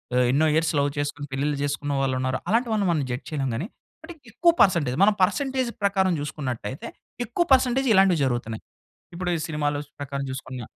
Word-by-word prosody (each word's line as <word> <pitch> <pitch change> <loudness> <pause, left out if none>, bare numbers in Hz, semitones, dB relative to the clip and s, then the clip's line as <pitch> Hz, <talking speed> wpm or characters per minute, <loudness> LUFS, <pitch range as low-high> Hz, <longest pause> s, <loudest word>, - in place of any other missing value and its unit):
ఆహ్, 125 - +4
ఎన్నో 150 +4 +3
years 160 0 +2
love 140 0 +2
చేసుకొని 145 0 -3
పెళ్ళిళ్ళు 140 +2 -1
జేసుకున్న 145 0 -2
వాళ్ళున్నారు. 130 0 0
అలాంటి 235 +3 +2
వాళ్ళని 205 -3 +1
మనం 155 -4 0
జడ్జ్ 125 - -4
చేయలేం 140 -4 -2
గానీ. 160 - -3 0.4
అంటే 345 - -9 0.2
ఎక్కువ 340 - +4
పర్సెంటేజ్ 165 -10 +3
మనం 210 - +5
పర్సెంటేజ్ 260 +3 0
ప్రకారంజూసుకున్నట్టయితే, 150 - -1 0.4
ఎక్కువ 240 +10 0
పర్సెంటేజ్ 260 +1 +3
ఇలాంటివి 190 -4 +5
జరుగుతున్నాయి. 120 -3 -3 0.5
ఇప్పుడు 180 +1 -3
ఈ - - -5
సినిమాల 145 -2 -1 0.2
ప్రకారం 140 0 -4
జూసుకున్నా 130 -2 -6
145 Hz, 160 wpm, -24 LUFS, 135-195 Hz, 0.5 s, మనం